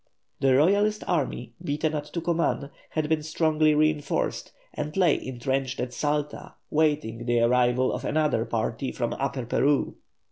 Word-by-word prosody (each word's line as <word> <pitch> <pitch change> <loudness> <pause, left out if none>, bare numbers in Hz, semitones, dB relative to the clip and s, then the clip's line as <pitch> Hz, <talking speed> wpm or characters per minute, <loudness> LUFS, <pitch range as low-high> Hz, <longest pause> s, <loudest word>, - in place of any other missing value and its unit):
The 135 -1 +4
Royalist 205 +8 +3
army, 130 -8 -2
beaten 150 +2 -1
at 150 -1 -2
Tucuman, 165 -4 -1 0.2
had 155 -1 -1
been 160 0 +1
strongly 155 0 +2
reinforced, 150 -1 0 0.2
and 150 +3 -4
lay 175 -6 +5
entrenched 130 +1 -2
at 125 0 -3
Salta, 150 +2 -2 0.2
waiting 145 -7 0
the 120 0 +2
arrival 125 +1 +3
of - - -4
another 150 -7 0
army 115 +3 -1
from 120 -2 -2
Upper 135 -2 -3
Peru. 140 +4 +1
145 Hz, 140 wpm, -26 LUFS, 125-155 Hz, 0.2 s, lay